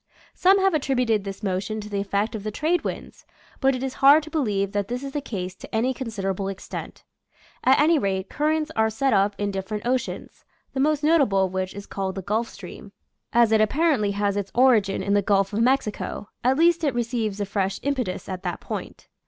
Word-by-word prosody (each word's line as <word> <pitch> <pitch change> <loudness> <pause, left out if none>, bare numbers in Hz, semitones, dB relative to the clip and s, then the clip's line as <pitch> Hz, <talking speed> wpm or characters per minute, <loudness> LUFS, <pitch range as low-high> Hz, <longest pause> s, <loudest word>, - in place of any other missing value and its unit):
Some 380 +2 +4
have 385 -1 +3
attributed 250 -8 +1
this 195 +1 -7
motion 195 +2 -2
to 210 - -7
the 205 -1 -3
effect 200 +2 -1
of 220 - -4
the 215 - -2
trade 315 +11 0
winds, - - -6 0.4
but 270 -1 +3
it 255 - -4
is 265 -1 -3
hard 285 +3 +7
to 315 - -10
believe 205 - 0
that 205 -1 -1
this 245 +2 -4
is 275 - -5
the 290 - -3
case 185 -8 -5
to 190 - -9
any 245 +4 +1
considerable 195 -6 -3
extent. 195 -1 -7 0.6
At 260 - +5
any 310 +1 +4
rate, 190 -2 -1
currents 310 +3 0
are 220 0 +3
set 260 +4 0
up 200 0 +2
in 205 0 -1
different 200 +3 -4
oceans, 255 0 -3 0.3
the 265 - -3
most 295 +1 +2
notable 275 -12 +4
of 185 - -6
which 185 0 -3
is 200 0 -7
called 190 -1 -4
the 195 - -5
Gulf 220 +4 -1
Stream, - - -11 0.4
as 235 -2 +4
it 220 -1 +4
ap 215 - +3
parently 280 -11 +2
has 200 0 0
its 200 -1 -3
origin 230 -7 +3
in 200 +1 0
the 205 - +4
Gulf 195 0 +1
of 215 - 0
Mexico; 230 -4 0
at 260 +2 +3
least 335 +1 +4
it 280 -5 +1
receives 230 -4 -2
a 205 - -1
fresh 195 -1 -1
impetus 255 -10 -2
at 185 -1 -5
that - - -4
point. - - -7
220 Hz, 215 wpm, -24 LUFS, 200-270 Hz, 0.6 s, hard